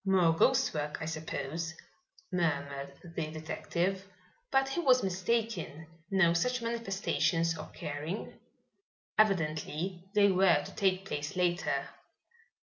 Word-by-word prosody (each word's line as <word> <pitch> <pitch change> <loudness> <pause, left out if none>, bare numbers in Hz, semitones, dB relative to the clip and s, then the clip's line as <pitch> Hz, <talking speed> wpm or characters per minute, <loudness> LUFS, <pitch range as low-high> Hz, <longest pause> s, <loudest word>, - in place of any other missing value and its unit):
"More 185 -4 +4
ghost 265 +10 +3
work, 150 0 -2
I - - -4
suppose," 160 0 -4 0.6
murmured 140 -5 -1
the 165 -2 -4
detective, 175 +4 -2 0.4
but 270 0 +3
he 270 - -1
was 255 -6 +5
mistaken, 190 -4 -1 0.2
no 190 -4 +4
such 250 +9 +1
manifestations 195 -7 0
occurring. 155 +3 -5 0.9
Evidently 175 -2 +1
they 200 -1 +6
were 180 -5 +4
to - - -9
take 190 -1 +1
place 150 0 -4
later. 180 0 +1
175 Hz, 110 wpm, -31 LUFS, 160-195 Hz, 0.9 s, they